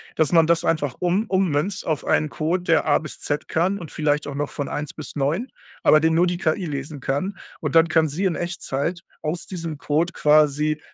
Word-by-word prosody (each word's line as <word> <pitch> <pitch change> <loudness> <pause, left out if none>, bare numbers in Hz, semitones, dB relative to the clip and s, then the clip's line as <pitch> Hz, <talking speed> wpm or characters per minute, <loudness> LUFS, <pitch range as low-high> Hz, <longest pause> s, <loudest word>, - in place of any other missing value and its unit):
dass 160 0 +2
man 165 -2 +6
das 170 0 +2
einfach 145 -6 0
um 180 +5 +1
ummünzt 185 -2 0
auf 155 -2 -1
einen 155 - +2
Code, 165 +5 -1
der 165 - +3
A 150 - +3
bis 155 - -9
Z 145 +1 -3
kann 185 +5 0
und 165 -4 -9
vielleicht 150 -1 0
auch 145 - -5
noch 145 0 -2
von 145 - -4
1 150 0 -4
bis 155 - -9
9, 155 - 0 0.3
aber 155 - +6
den 160 +1 +2
nur 175 +2 +4
die 175 0 -1
KI 175 +2 0
lesen 145 0 -5
kann. 145 +10 -2 0.2
Und 155 -5 -3
dann 165 0 +6
kann 160 0 +3
sie 160 +7 -2
in 180 -4 +1
Echtzeit 170 -1 -3 0.2
aus 160 +3 -3
diesem 165 -5 -5
Code 160 +5 0
quasi 150 0 +3
160 Hz, 215 wpm, -23 LUFS, 150-175 Hz, 0.3 s, man